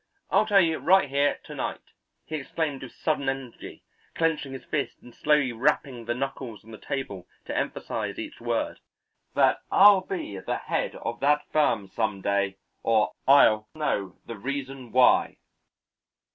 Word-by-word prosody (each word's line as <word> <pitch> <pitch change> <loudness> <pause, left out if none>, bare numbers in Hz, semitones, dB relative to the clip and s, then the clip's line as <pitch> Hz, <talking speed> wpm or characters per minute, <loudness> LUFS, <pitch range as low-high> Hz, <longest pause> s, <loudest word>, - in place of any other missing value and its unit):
I'll 215 - +4
tell 200 -2 +6
you 160 -2 +1
right 190 -5 +4
here 140 +1 +1
to - - -10
night," - - -5 0.3
he 155 - -4
exclaimed 145 0 -3
with 130 - -8
sudden 145 -4 -1
energy, 135 -3 -7 0.3
clenching 160 -4 0
his 130 - -8
fist 150 - -2
and 120 - -14
slowly 150 -3 +2
rapping 125 -1 0
the 120 +1 -1
knuckles 130 -4 -5
on 115 - -13
the 110 - -10
table 100 -10 -5 0.2
to - - -5
emphasize - - -3
each - - -7
word, - - -2 0.6
"that - - +3
I'll 200 -1 +7
be 175 - -5
the - - -2
head - - -2
of 120 +1 -5
that 145 +1 +2
firm 115 -10 +2
some 105 0 -2
day, 100 0 0 0.2
or 110 -2 +2 0.2
I'll 110 -6 +6
know 100 - -2
the 115 - -7
reason 135 0 -5
why." 125 0 +4
135 Hz, 160 wpm, -26 LUFS, 115-150 Hz, 0.6 s, I'll